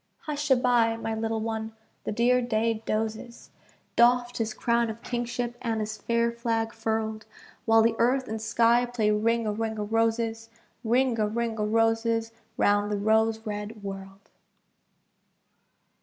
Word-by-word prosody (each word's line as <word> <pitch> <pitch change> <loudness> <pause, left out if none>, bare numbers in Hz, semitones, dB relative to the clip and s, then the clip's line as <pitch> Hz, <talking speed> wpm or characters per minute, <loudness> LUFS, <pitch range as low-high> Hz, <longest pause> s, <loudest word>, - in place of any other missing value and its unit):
Hush 300 -1 -4
a 265 - +7
bye, 240 -2 +2
my 225 -1 -3
little 225 0 -2
one, 220 0 -3 0.3
the - - -2
dear 245 +3 +3
day 225 -2 0
dozes, 220 +2 -3 0.4
Doffed 245 +1 +3
his 225 -1 -1
crown 235 +1 +1
of 220 +1 -8
kingship 240 0 -3
and 225 -2 -1
his 215 0 -3
fair 235 0 +1
flag 230 -1 -2
furled, 220 -1 -3 0.4
While 225 -1 +5
the 225 0 +2
earth 255 +3 +2
and 220 0 -4
sky 235 +2 +3
play 225 -3 0
Ring 230 +2 +1
a 210 - 0
ring 220 +1 -3
o' 210 - -2
roses, 225 +1 0 0.3
Ring 245 +1 +2
a 210 - +2
ring 230 +1 -2
o' 210 - 0
roses 225 +1 +1 0.3
round 205 0 +2
the 205 - 0
rose 220 +2 +1
red 210 0 -5
world. 195 0 -8
225 Hz, 155 wpm, -27 LUFS, 220-235 Hz, 0.4 s, a